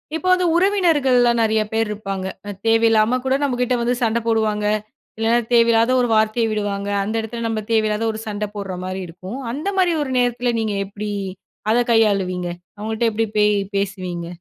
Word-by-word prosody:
இப்போ 345 +3 -3
வந்து 365 0 +2
உறவினர்கள்லாம் 290 - +3
நெறைய 220 0 +2
பேர் 225 0 +1
இருப்பாங்க. 195 -2 -4 0.2
அ - - -4 0.2
தேவையில்லாம 225 +1 +3
கூட 265 0 +2
நம்மகிட்ட 250 -2 0
வந்து 240 +1 +1
சண்ட 230 0 +1
போடுவாங்க. 215 -2 +1 0.5
இல்லன்னா 225 +2 +2
தேவையில்லாத 230 0 +4
ஒரு 245 - +1
வார்த்தைய 220 +2 +2
விடுவாங்க. 205 -1 -2
அந்த 215 +3 -3
இடத்தில 230 +1 -6
நம்ம 220 -1 -2
தேவையில்லாத 215 0 +1
ஒரு 220 - -7
சண்ட 210 0 -2
போட்ற 195 -2 -4
மாரி 185 +1 -4
இருக்கும். 185 +7 -8
அந்த 295 +9 -5
மாரி 355 -2 +3
ஒரு 265 - -5
நேரத்தில 245 0 +1
நீங்க 215 -2 -1
எப்படி 205 +2 -6 0.6
அத 235 - +3
கையாளுவீங்க? 195 -5 +2 0.3
அவுங்கள்ட்ட 220 +2 -1
எப்பிடி 225 +1 0
பே 210 - +5 0.3
பேசுவீங்க? 185 -4 -3
225 Hz, 160 wpm, -20 LUFS, 210-240 Hz, 0.6 s, பே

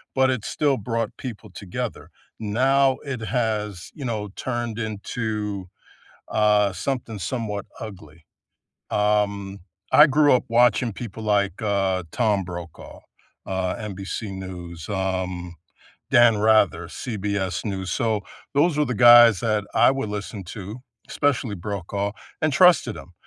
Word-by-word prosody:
but 130 0 +4
it 120 -5 -2
still 145 -3 +1
brought 115 +2 -3
people 110 -5 -8
together. 105 +6 -6 0.3
Now 130 +5 +2
it 135 -4 -4
has, 105 -5 -2
you 140 - -7
know, 105 -3 -3
turned 120 -3 -3
into, 105 -2 -3 0.6
uh, 105 -2 +3
something 115 0 -3
somewhat 105 0 -3 0.2
ugly. 85 -8 -10 0.7
Um, 100 -2 0 0.3
I 150 - +9
grew 145 -1 +4
up 125 - +3
watching 120 -1 +3
people 110 -1 -7
like, 100 -2 +1
uh, 95 -3 0
Tom 105 -5 +1
Brokaw, 85 -2 -9 0.5
uh, 95 -1 -2
NBC 100 0 -5
News, 90 -3 -8
um, 95 -3 -3 0.6
Dan 120 -2 +6
Rather, 110 0 +3
CBS 100 -5 -3
News, 95 -2 -3
so, 110 -4 0 0.3
those 150 +2 +3
were 150 - +3
the 125 - -2
guys 120 -3 +8
that 105 -2 +1
I - - +5
would 135 -6 -3
listen 105 -1 -5
to, 105 +4 -7 0.3
especially 125 -7 0
Brokaw, 100 +2 -3 0.3
and 155 -1 +2
trusted 170 - +5
him, 90 - -12
105 Hz, 130 wpm, -23 LUFS, 95-120 Hz, 0.7 s, I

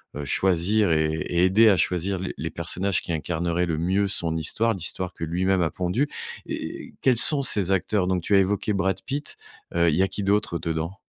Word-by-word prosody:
heu, 75 - -5
choisir 95 +6 +1
et 80 -1 +1
et 85 +2 -1
aider 100 +5 +5
à 100 - +4
choisir 90 +3 -1
les 95 - -5
les - - -4
personnages 95 +1 -2
qui - - -6
incarneraient 85 +2 -1
le 80 -3 -2
mieux 95 +5 0
son 85 -4 +1
histoire, 110 +9 0
l'histoire 95 0 -4
que 80 - -5
lui-même 90 +3 0
a 85 - +1
pondue. 95 - -1 0.4
Et - - -6
et - - -16
quels 130 -3 +3
sont 140 +5 +8
ces 100 -8 +1
acteurs 95 0 0
donc? 90 -1 0
Tu 100 - +1
as - - +6
évoqué 100 +2 0
Brad 95 -1 -1
Pitt, 145 +2 -4 0.4
heu, 85 0 +3
il 75 - 0
y 90 - +2
a - - +2
qui 100 - -5
d'autre 100 -3 0
dedans? 85 +3 -4
95 Hz, 215 wpm, -24 LUFS, 85-100 Hz, 0.4 s, sont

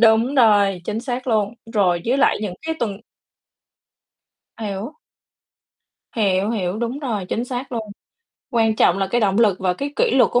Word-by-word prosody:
Đúng 230 +3 +4
rồi, 205 -7 +4
chính 215 +3 -3
xác 250 +1 -4
luôn. 215 -1 +1 0.2
Rồi 180 -4 +2
với 260 +3 +2
lại 280 - +3
những 190 -4 -3
cái 320 - -1
tuần 205 -4 -2 1.6
Hiểu. 210 +4 -5 1.2
Hiểu, 200 -1 +1
hiểu, 195 -3 -2
đúng 240 +3 -2
rồi, 225 -10 -3
chính 235 - -1
xác 250 +1 -5
luôn. 220 -3 -4 0.6
Quan 225 -3 +2
trọng 180 -2 +3
là 195 - 0
cái 240 - +2
động 200 -1 +2
lực 205 -5 +3
và 185 -2 +1
cái 280 +7 -4
kỷ - - +2
luật 260 - +4
của 245 - +3
220 Hz, 175 wpm, -21 LUFS, 200-245 Hz, 1.6 s, Đúng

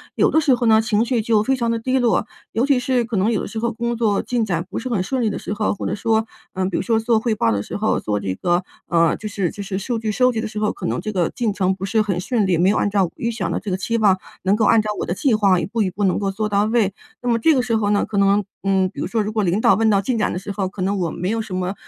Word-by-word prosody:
有 - - +3
的 315 - +3
时 285 -4 +3
候 240 -1 +1
呢， 220 -1 +6
情 225 -1 +1
绪 235 -1 0
就 220 -1 +2
非 265 +5 +1
常 235 -2 -1
地 230 - -1
低 255 +3 0
落， 235 -3 +1 0.2
尤 230 - 0
其 280 -3 +3
是 250 -1 +1
可 225 -2 -3
能 200 +5 +2
有 215 - 0
的 - - -5
时 220 - -8
候 235 +1 -1
工 235 +1 -2
作 215 -3 +1
进 240 -2 -1
展 170 -4 -2
不 - - -5
是 245 - -4
很 220 -6 0
顺 255 +7 -2
利 220 - +2
的 - - -4
时 - - -6
候， 210 0 0
或 200 - -5
者 - - -1
说， 220 +1 0 0.3
嗯， 185 0 -1
比 185 - -2
如 - - 0
说 225 -2 +1
做 225 0 +2
汇 225 0 0
报 115 - +1
的 100 -1 -1
时 - - -7
候， 215 +1 +1
做 105 -1 -2
这 95 -2 -3
个 175 - 0 0.2
呃， 170 -1 +3
就 215 - -6
是 195 -4 -1
就 205 - -7
是 195 -1 -3
数 235 +4 -2
据 220 -1 -2
收 250 +4 +3
集 230 - -3
的 225 - -3
时 215 -1 -5
候， 210 0 +1
可 185 - -7
能 - - -1
这 215 - -4
个 180 -5 0
进 230 -4 -2
程 190 -2 +1
不 190 +1 -5
是 220 +3 +1
很 195 -4 -1
顺 215 +3 0
利， 180 -3 +2
没 180 +3 +3
有 210 - +2
按 - - +1
照 195 -3 +1
预 235 - -2
想 235 - -3
的 - - -1
这 210 - -6
个 185 - 0
期 230 +5 -1
望 205 -4 +4 0.3
能 195 +2 +3
够 215 0 +1
按 225 +1 +5
照 215 - -4
我 - - -1
的 175 - -2
计 255 +6 +1
划 195 -4 +3
一 - - -2
步 225 +2 -2
一 195 - +1
步 200 +3 -3
能 185 - +2
够 195 -1 -1
做 215 +2 -2
到 200 0 +2
位。 215 -3 +1 0.3
那 245 - -2
么 230 - +3
这 320 +8 +4
个 255 - +3
时 245 -2 -1
候 205 -2 0
呢， 205 0 +2
可 210 - -4
能 200 +1 +3 0.2
嗯， 190 -1 +2
比 - - -11
如 - - -2
说 225 - 0
如 210 - -3
果 215 -1 0
领 190 +3 +1
导 195 - +5
问 220 +2 +2
到 200 -2 +3
进 235 +4 -1
展 215 - 0
的 180 - -3
时 200 +2 -6
候， 195 -1 -2
可 185 0 -8
能 195 +2 0
我 170 -3 0
没 180 - -3
有 225 +1 0
什 215 -3 -7
么， 185 +1 -2
210 Hz, 360 characters per minute, -21 LUFS, 190-230 Hz, 0.3 s, 呢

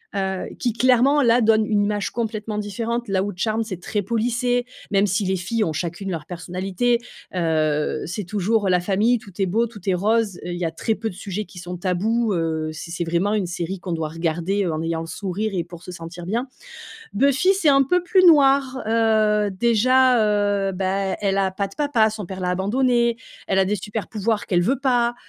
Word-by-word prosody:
heu, 190 -1 -2
qui 240 -3 0
clairement 255 +4 +4
là 235 0 +4
donne 220 -1 +4
une 210 -1 +1
image 205 0 -1
complètement 215 -2 -3
différente. 230 +3 -3
Là 190 -1 +1
où 205 - -3
Charmed 220 +4 0
c'est 185 -5 -6
très 205 +3 -2
policé, 240 +3 0 0.3
même 200 0 +3
si 200 +2 0
les 190 +1 +1
filles 215 +5 -1
ont 160 - -1
chacune 175 +5 -4
leur 160 -4 -4
personnalité, 185 +7 -1 0.3
heu, 155 -4 0
c'est 180 +4 -5
toujours 205 +3 0
la 180 -1 +4
famille. 210 +6 +2
Tout 200 - -14
est - - +3
beau, 220 +6 +1
tout 220 -2 -12
est - - +3
rose. 210 +1 +1
Il 180 - -4
y 175 - -2
a 165 - -1
très 220 +7 -1
peu 220 +1 -3
de 180 - -10
sujets 200 +2 -5
qui 185 - -16
sont 175 +1 -6
tabous, 205 +5 0
heu, 160 -2 -1
c'est 165 +2 -8
c'est 170 0 -2
vraiment 175 +5 0
une 210 -3 0
série 175 +2 -4
qu'on 180 -1 -4
doit 160 -2 -2
regarder, 170 +5 -1
heu, 170 - -1
en 155 - -3
ayant 165 0 -1
le 165 - -7
sourire 200 +5 -3
et 175 -3 -1
pour 170 0 -12
se 180 - -8
sentir 170 +1 -8
bien. 235 +8 -2 0.7
Buffy, 275 - +3
c'est 375 -5 +1
un 275 -1 +6
peu 360 +7 +1
plus 370 0 +4
noir, 275 -5 +5
heu, 215 -2 +2
déjà, 240 +4 +3 0.5
heu, - - 0
bah, 190 +1 -1
elle 195 -1 0
a 195 -1 +2
pas 200 +1 -2
de 195 - -14
papa, 265 -8 +2
son 210 -3 -6
père 190 +1 -7
l'a 180 -1 -1
abandonnée. 235 +5 +1 0.3
Elle 190 - +2
a 190 - +5
des 200 +2 0
supers 210 +1 -5
pouvoirs 215 0 -1
qu'elle 175 -4 +2
veut 255 +9 +1
pas, 245 -3 +2
205 Hz, 215 wpm, -22 LUFS, 180-230 Hz, 0.7 s, un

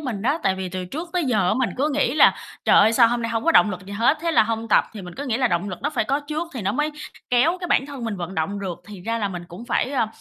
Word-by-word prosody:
mình 240 -9 -4
á, 280 +7 +1
tại 190 -1 +2
vì 190 -1 -4
từ 185 0 -5
trước 315 - -6
tới 355 -3 0
giờ 210 -8 +1
á - - +2
mình 260 -3 0
cứ 280 +4 +1
nghĩ 290 - +1
là 310 - +6 0.3
"Trời - - +5
ơi, 220 +2 +5
sao 230 -1 +6
hôm 240 0 -1
nay 230 - -2
hông 225 -1 -2
có 330 - +3
động 215 - +6
lực 185 0 -7
gì 200 - -8
hết?" 235 +9 +2
Thế 335 0 0
là 310 - +5
hông 225 +1 -3
tập. - - +4
Thì 210 - -8
mình 180 -1 -9
cứ 285 - -6
nghĩ 235 -3 0
là 255 -2 +2
động 175 +4 -1
lực 185 - -6
nó 290 - 0
phải 305 - 0
có 280 +1 0
trước 310 +3 -4
thì 235 - -4
nó 195 - 0
mới 295 +6 0 0.4
kéo 295 +9 +3
cái 355 - -3
bản 270 - +2
thân 275 -4 -7
mình 220 -3 -3
vận 180 +1 -6
động 190 +5 -2
được, 185 -3 -4
thì 205 -3 -10
ra 230 +3 -2
là 205 - -1
mình 175 -2 -6
cũng 185 +7 -10
phải, 255 - 0
a, 260 -5 +1
230 Hz, 335 wpm, -23 LUFS, 195-280 Hz, 0.4 s, là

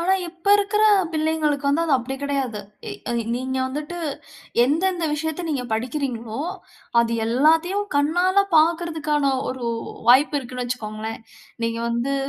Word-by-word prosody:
ஆனா, 360 +3 +2 0.2
இப்ப 350 +2 -17
இருக்கிற 410 +1 +1 0.3
பிள்ளைகளுக்கு 310 -2 0
வந்து, 295 +4 +2
அது 305 - +1
அப்படி 255 +2 -4
கிடையாது. 270 -7 -2 0.3
இ - - -4 0.2
எ - - 0 0.2
நீங்க 260 +1 -3
வந்துட்டு 295 +6 -5 0.7
எந்தெந்த 345 +5 +1
விஷயத்த 320 +3 -3
நீங்க 265 -4 -2
படிக்கிறீங்களோ, 240 -1 -3 0.6
அது 235 0 0
எல்லாத்தையும் 325 - +2
கண்ணால 355 +7 +3
பார்க்கறதுக்கான 315 -3 +2 0.2
ஒரு 255 -1 -5 0.4
வாய்ப்பு 280 +5 +6
இருக்குனு 250 -1 -5
வச்சிக்கோங்களேன். 220 -2 -5 0.4
நீங்க 230 0 -1
வந்து 235 +4 -1
285 Hz, 125 wpm, -23 LUFS, 250-325 Hz, 0.7 s, வாய்ப்பு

